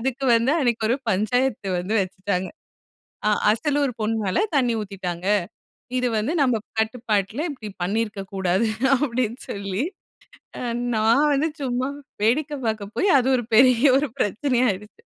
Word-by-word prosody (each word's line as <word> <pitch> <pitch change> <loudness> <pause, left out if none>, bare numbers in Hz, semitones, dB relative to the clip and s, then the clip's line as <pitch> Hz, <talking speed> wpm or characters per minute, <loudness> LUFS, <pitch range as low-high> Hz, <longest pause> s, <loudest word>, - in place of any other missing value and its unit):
அதுக்கு 265 +2 -2
வந்து 230 +3 +2
அன்னைக்கு 235 -4 +1
ஒரு 235 - +3 0.2
பஞ்சாயத்து 215 +2 0
வந்து 185 +5 -2
வச்சுட்டாங்க. 190 0 -2 0.8
அ - - +4 0.2
"அசலூர் 285 +2 0
பொண்ணு 220 +1 0
மேல 190 - 0 0.2
தண்ணி 245 -4 +2
ஊத்திட்டாங்க. 185 -3 -5 0.7
இது 250 0 +1
வந்து 220 +8 -1
நம்ம 245 -5 +2 0.2
கட்டுப்பாட்ல 220 - -1
இப்டி 220 -6 -8
பண்ணியிருக்க 205 +1 -2
கூடாது!" 190 +3 +1 0.3
அப்டின்னு 250 -3 -1
சொல்லி. 200 +3 -2 1.1
நான் 230 +8 +4
வந்து 285 +3 +2
சும்மா 255 -1 -1 0.4
வேடிக்கை 285 +7 +1
பார்க்க 215 -2 -3
போய் 400 - +2
அது 250 - 0
ஒரு 240 - -3
பெரிய 255 +2 +6
ஒரு 285 +2 +2
பிரச்சனையா 250 +5 +1
ஆகிடுச்சு. 210 - -12
230 Hz, 135 wpm, -23 LUFS, 205-260 Hz, 1.1 s, பெரிய